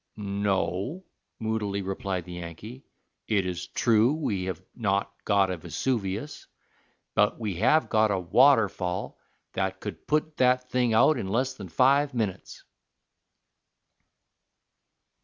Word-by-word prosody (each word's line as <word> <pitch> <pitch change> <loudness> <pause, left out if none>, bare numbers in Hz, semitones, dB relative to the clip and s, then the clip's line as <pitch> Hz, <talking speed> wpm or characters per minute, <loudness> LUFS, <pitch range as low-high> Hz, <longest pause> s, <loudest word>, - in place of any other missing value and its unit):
"No," 100 - -2 0.3
moodily 105 -3 -2
replied 95 -2 -3
the 90 - -10
Yankee. 90 - -9 0.4
"It 100 -4 +1
is 90 0 -4
true 115 +3 +3
we 105 -12 -2
have 95 -3 -4 0.2
not 100 -3 -1
got 100 -2 +3
a 90 - -3
Vesuvius, 110 - -3 0.7
but 105 +2 +2
we 105 -6 -3
have 130 - +3
got 110 -1 +3
a 100 - +1
waterfall 100 -2 +2 0.3
that 95 0 -2
could 105 - -8
put 155 +1 0
that 125 0 +2
thing 125 -3 +2
out 155 +7 +5
in 95 - -4
less 130 +6 0
than 100 -8 -9
five 135 - +3
minutes." 105 -6 -4
105 Hz, 120 wpm, -27 LUFS, 95-125 Hz, 0.7 s, out